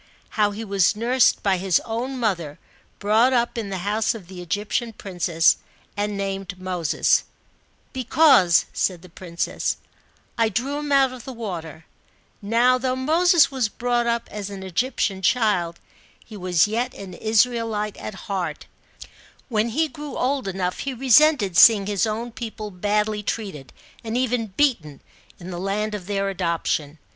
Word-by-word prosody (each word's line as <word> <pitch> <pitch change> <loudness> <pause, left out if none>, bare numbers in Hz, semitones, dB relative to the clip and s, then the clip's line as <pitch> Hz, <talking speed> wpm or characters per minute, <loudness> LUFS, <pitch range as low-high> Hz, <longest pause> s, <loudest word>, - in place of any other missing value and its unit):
How 210 -2 +2
he 210 +2 -6
was 195 -2 +2
nursed 240 +3 +2
by 195 -2 +2
his 185 -2 +2
own 245 +3 -3
mother, 170 -10 -2 0.4
brought 220 +5 +3
up 240 -1 +1
in 225 -4 -4
the 190 - -3
house 215 +3 0
of 210 -5 -9
the 185 -1 -9
Egyptian 205 +6 -2
princess, 175 -5 +1 0.4
and 205 0 -2
named 195 -2 -4
Moses: 180 -4 +1 0.3
" - - -39
Because," 255 - +4
said 180 -2 -1
the 185 - -13
princess, 170 0 -3 0.3
" - - -37
I 225 -1 +3
drew 260 +7 -2
him 295 -1 -5
out 270 -2 +4
of 250 -3 -10
the 260 - -8
water/' 165 -8 -6 0.6
Now, 235 +5 +3
though 255 0 -1
Moses 320 +4 +4
was 255 -5 0
brought 240 +1 -1
up 235 0 -1
as 205 -1 -5
an 195 -1 -8
Egyptian 195 0 -1
child, 185 -6 +1 0.5
he 220 - -11
was 180 -4 +2
yet 240 +4 -2
an 195 -2 -9
Israelite 220 0 0
at 190 - -8
heart; 180 -6 -3 0.8
when 220 -1 +1
he 315 +8 +1
grew 295 -1 -8
old 265 -2 -1
enough 185 -1 -2
he 275 -2 -4
resented 260 - +4
seeing 210 -1 +7
his 205 +2 0
own 230 +3 -3
people 220 -3 -7
badly 210 +3 0
treated, 195 - -5 0.3
and 225 +1 -2
even 250 -3 0
beaten, 190 - 0 0.4
in 180 +1 -8
the 175 - -5
land 205 +3 -2
of 195 -4 -6
their 200 -1 -1
adoption. 170 -5 -2
210 Hz, 160 wpm, -23 LUFS, 190-245 Hz, 0.8 s, seeing